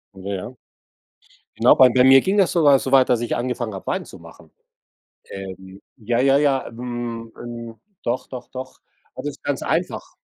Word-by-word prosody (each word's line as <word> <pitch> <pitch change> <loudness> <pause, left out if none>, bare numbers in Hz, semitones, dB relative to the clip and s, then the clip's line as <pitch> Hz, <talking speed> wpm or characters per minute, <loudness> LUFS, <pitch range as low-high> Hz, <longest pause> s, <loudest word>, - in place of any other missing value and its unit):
Ja 95 +1 -6
ja. 100 +7 -6 1.0
Genau, - - +5
bei 130 - +7
bei 125 +1 +3
mir 135 0 +8
ging 190 +6 0
das 195 -3 +3
sogar 145 -5 +5
so 130 - -5
weit, 135 -1 +5
dass 120 -2 +2
ich 120 - -2
angefangen 120 -3 -3
habe, 95 - -9
Wein - - -2
zu - - -13
machen. - - -16 0.8
Ähm, 95 0 -9
ja, 120 +1 -2
ja, 135 +1 +4
ja. 140 -2 +1
Hm, 120 -1 -6
'n 115 -1 -8 0.2
doch, 120 +2 -2
doch, 125 -2 -9
doch. 130 0 -8 0.4
Das 130 - -7
ist 145 - -7
ganz 140 -2 -2
einfach. - - -3
125 Hz, 180 wpm, -21 LUFS, 115-135 Hz, 1.0 s, mir